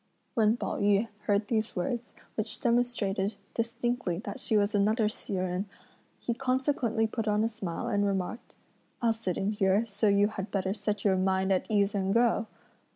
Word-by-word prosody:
When 220 0 +3
Pao - - -3
yü 205 +2 +3 0.2
heard 205 0 +2
these 220 -1 -1
words, 235 +6 -3 0.2
which 215 0 -2
demonstrated 225 -4 +1 0.2
distinctly 235 -4 -1
that 265 - -5
she 220 -3 +2
was 205 +1 +2
another 210 +2 +3
Hsi 210 - -5
Jen, 185 +1 -1 0.5
he 240 - -1
consequently 255 -3 +1
put 220 0 -3
on 210 0 +2
a - - +3
smile 205 -7 -4
and 205 0 +1
remarked: 195 +3 -2 0.5
"I'll 230 -1 +4
sit 220 -6 -3
in 195 +2 0
here, 200 +1 +2
so 215 0 0
you 200 +1 +4
had 200 -2 -5
better 190 -1 0
set 205 0 -3
your 190 -2 +4
mind 190 +1 +2
at 185 - 0
ease 205 -2 +2
and 195 -1 0
go!" 230 0 +3
210 Hz, 175 wpm, -29 LUFS, 195-230 Hz, 0.5 s, I'll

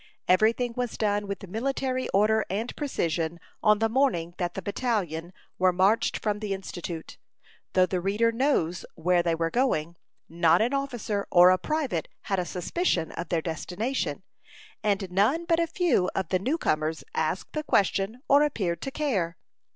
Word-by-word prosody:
Every 215 +5 +5
thing 245 0 -3
was 245 -2 -3
done 205 -1 0
with 195 0 -5
military 255 +5 -2
order 215 +2 +3
and 215 +6 -3
precision 170 - -2 0.2
on 215 -1 +5
the 225 +1 +2
morning 225 -9 +1
that 175 -1 -2
the 195 - -3
battalion 185 -6 -2 0.3
marched 185 +4 +3
from 210 -1 -1
the 205 -2 -2
Institute. 175 -3 -7 0.5
Though 185 -1 +5
the 185 -1 -2
reader 210 +5 +2
knows 230 - 0
where 175 +2 +2
they 170 -1 +1
were 165 0 -1
going, 170 - 0 0.3
not 165 -1 +3
an 235 +5 +1
officer 240 -7 -2
or 180 +1 +7
a 185 - +3
private 280 - -1
had 195 -2 -1
a 180 - -1
suspicion 180 - -1
of 170 -1 -6
their 165 -2 0
destination; 180 - -3 0.6
and 200 -3 0
none 225 - +2
but 330 0 +2
a 335 - +2
few 330 - +1
of 190 -4 -1
the 185 - +2
new 265 - 0
comers 155 - -1
asked 160 +4 -2
the 305 - -1
question, 205 0 +1
or 280 +1 +6
appeared 195 - 0
to - - -3
care. 205 - -1
200 Hz, 165 wpm, -27 LUFS, 175-245 Hz, 0.6 s, or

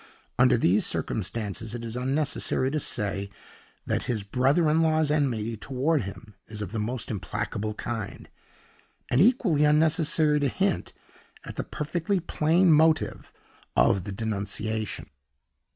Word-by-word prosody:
Under - - +5
these - - +3
circumstances, 110 0 -2
it 120 -1 -6
is 115 0 -5
unnecessary 130 0 0
to 155 - 0
say 100 -6 -2 0.6
that - - -1
his 115 -5 -1
brother 135 - +2
in 155 +2 +3
law's 155 -2 +2
enmity 120 -7 0
toward 135 +7 0
him 100 +2 -9
is 110 -1 -7
of 95 - -7
the 115 - -3
most 115 +3 -3
implacable 105 +1 -3
kind, 110 -3 -5 0.8
and 125 - +4
equally 195 - +3
unnecessary 155 0 +3
to 145 - +1
hint 190 +8 -1 0.5
at - - -7
the - - -2
perfectly 170 +5 -2
plain 170 +1 +2
motive 160 +1 +2 0.5
of 95 -3 +4
the - - -5
denunciation. 110 0 -3
130 Hz, 135 wpm, -26 LUFS, 110-155 Hz, 0.8 s, Under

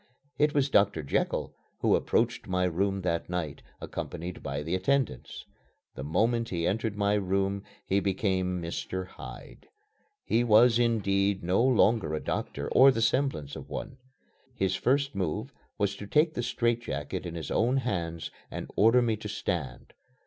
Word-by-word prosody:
It 150 0 +3
was 140 -1 +3
"Doctor 100 -6 +3
Jekyll" 70 - -1 0.3
who - - +4
approached - - 0
my 90 0 0
room 95 +3 0
that 85 -1 -1
night, 85 -5 -3 0.2
accompanied 90 +2 -6
by 70 +2 -4
the 80 +3 -3
attendants. 115 - -1 0.5
The 65 - -6
moment 115 - +1
he 85 -2 -1
entered 110 +2 -1
my 100 0 +2
room 100 0 0 0.2
he 100 - +2
became 95 -2 0
"Mr. 90 +2 -4
Hyde." 95 - -11 0.6
He 115 +2 +2
was, 115 +1 +5
indeed, 100 -4 +1
no 90 +5 +2
longer 115 -9 +3
a - - -2
doctor, - - -3
or 135 +1 +8
the 125 - +1
semblance 115 - 0
of - - -9
one. 130 - -6 0.6
His 95 -5 0
first 140 +7 +1
move 95 -6 -3 0.2
was 100 -1 0
to 100 - -8
take 155 +6 +3
the 120 - -2
straitjacket 115 - -1
in 85 -2 -6
his 80 - -5
own 125 +4 +2
hands 85 -10 -2 0.2
and - - -6
order 115 +4 +5
me 115 -2 +1
to - - -7
stand. - - -4
100 Hz, 155 wpm, -28 LUFS, 90-115 Hz, 0.6 s, or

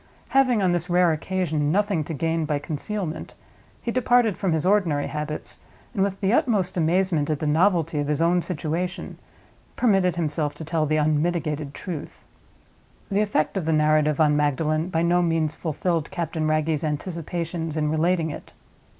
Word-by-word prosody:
Having, 255 -6 +3
on 185 - +3
this 175 +1 -1
rare 175 -1 +4
occasion, 155 -2 -1
nothing 200 -3 +1
to 165 - -5
gain 165 +2 0
by 150 -1 0
concealment, 160 +4 -5 0.5
he 235 - -1
departed 245 -4 +3
from 190 - -1
his 160 0 0
ordinary 180 -8 +2
habits, 150 0 -5 0.3
and, 200 - -1
with 195 0 -1
the 195 +2 +2
utmost 225 - +1
amazement 170 -2 +1
at 155 - +1
the 155 - -4
novelty 165 0 +2
of 145 - -1
his 150 -1 0
own 175 +2 +3
situation, 175 +2 -3 0.6
permitted 195 -7 +2
himself 150 -3 -1
to 160 - -8
tell 160 -1 0
the 155 - +1
unmitigated 150 -1 0
truth. 170 -6 -7 0.9
The 200 +1 +2
effect 205 -7 0
of 180 - -2
the 160 - +1
narrative 150 -1 +3
on 150 -2 +4
Magdalen 155 +3 0
by 165 -2 0
no 175 +1 +3
means 165 -3 +1
fulfilled 165 0 -2
Captain 160 -2 -2
Wragge's 155 0 0
anticipations 165 +1 -3
in 150 -1 0
relating 160 0 +1
it. - - -10
165 Hz, 165 wpm, -24 LUFS, 150-185 Hz, 0.9 s, rare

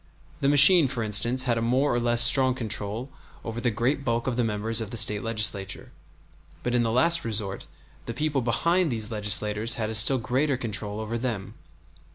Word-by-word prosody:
The 140 - -1
machine, 145 +3 +7
for 120 -3 -6
instance, 115 +4 +3
had 120 -3 -2
a - - -5
more 125 +4 -1
or 120 - -2
less 120 0 +3
strong 130 +1 +5
control 110 +1 -3 0.3
over 115 +1 -7
the 120 - -1
great 120 +6 -3
bulk 120 -2 -4
of 130 - -4
the 120 - -2
members 110 +1 -2
of 110 - -7
the 115 - -7
State 105 -1 +6
Legislature; 105 -3 -3 0.7
but 125 - -4
in 120 - 0
the 115 - -2
last 170 +8 +1
resort 105 -3 -5 0.4
the 115 - -6
people 150 -3 -3
behind 165 - -1
these 110 -1 -5
legislators 105 +1 0
had 110 -1 -5
a - - -7
still 110 +5 +3
greater 130 +3 -3
control 105 -3 -4
over 110 +2 -6
them. 110 -5 -6
115 Hz, 195 wpm, -23 LUFS, 110-130 Hz, 0.7 s, machine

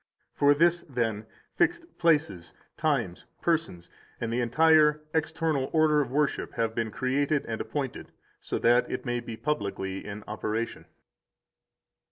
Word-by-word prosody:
For 145 0 +4
this, 170 +3 +3
then, 115 -4 -2 0.3
fixed 345 -1 -1
places, 150 - +1 0.2
times, 130 - -1
persons, 160 - -1 0.3
and 115 -1 -2
the 125 - +1
entire 150 +4 +4
external 160 -3 0
order 155 -2 +4
of 135 - -3
worship 145 +2 0
have 115 -1 -1
been 115 -1 -1
created 140 +5 0
and 110 -1 -4
appointed, 140 -4 -4 0.3
so - - -3
that 120 +1 +3
it - - -4
may 120 -1 -1
be 115 -1 -7
publicly 100 -9 -3
in 100 +1 -7
operation. 110 +2 -3
135 Hz, 135 wpm, -28 LUFS, 115-155 Hz, 0.3 s, For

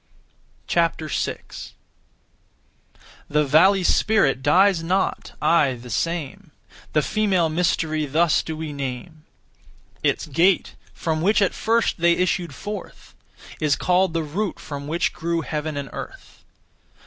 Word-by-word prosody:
6. 165 -2 -2 1.6
The 150 0 +2
valley 180 +7 +4
spirit 175 -10 +2
dies 180 +5 +4
not, 185 +4 -1
aye 145 -6 +3
the 120 0 -10
same; 170 +2 -3 0.4
The 150 - +3
female 195 -6 +1
mystery 155 -2 0
thus 160 +3 +2
do 160 -1 -6
we 155 -2 -5
name. 140 +3 -6 0.8
Its - - 0
gate, 170 +5 +2 0.2
from 160 -1 -2
which 205 +6 +3
at 195 -3 +2
first 230 -3 0
they 170 0 +4
issued 175 -4 -1
forth, 205 +3 -8 0.5
Is 150 -2 +2
called 180 +1 +1
the 165 - 0
root 185 +7 -3
from 140 -1 -7
which 165 +3 0
grew 170 -1 -2
heaven 155 -1 -4
and 140 -1 -4
earth. - - -10
165 Hz, 125 wpm, -23 LUFS, 150-185 Hz, 1.6 s, valley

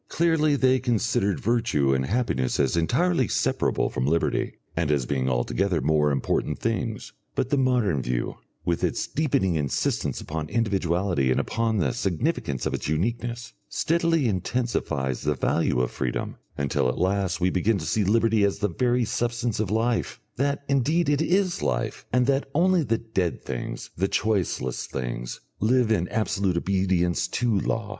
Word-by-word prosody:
Clearly 160 -3 +2
they 130 -1 +3
considered 110 -5 0
virtue 110 - +1
and 65 0 0
happiness 95 - 0
as 70 +1 +2
entirely 130 - +2
separable - - +1
from 65 +2 -1
liberty, 80 +3 0 0.2
and 80 -2 0
as 70 -4 +1
being 65 0 0
altogether 80 +9 0
more 75 +1 +2
important 70 -2 0
things. - - -3 0.2
But 125 - -1
the 145 - +3
modern 120 - +2
view, - - -2 0.3
with 85 -1 0
its - - 0
deepening 125 - +1
insistence 75 -4 -1
upon 75 -1 -5
individuality 95 - +1
and 65 - +2
upon 115 -1 0
the 95 - +1
significance 85 - -1
of - - -1
its - - -3
uniqueness, 120 +8 -2 0.2
steadily 165 -3 +1
intensifies 90 - -1
the 75 0 0
value 65 - +1
of 60 - -1
freedom, 60 - -3 0.2
until 70 -2 +1
at 60 - -3
last 95 0 0
we 90 0 +2
begin 100 +4 +2
to 80 - -5
see 105 - +1
liberty 110 +1 +3
as 100 -1 +2
the 105 +1 0
very 120 +6 +1
substance 120 0 -1
of 110 -4 0
life, 115 +3 0 0.2
that 140 +2 0
indeed 145 +4 +2
it 145 +1 +2
is 185 +2 +1
life, - - -2
and 125 +1 +3
that 135 +1 +1
only 180 +2 +4
the 115 -6 +1
dead 95 -7 -2
things, 60 - -5
the 95 +3 +1
choiceless 95 - -1
things, - - -5 0.2
live 120 +1 +2
in 90 -5 +2
absolute 100 -4 0
obedience 90 -2 +1
to 115 0 +1
law. 110 +2 -2
100 Hz, 160 wpm, -25 LUFS, 80-120 Hz, 0.3 s, only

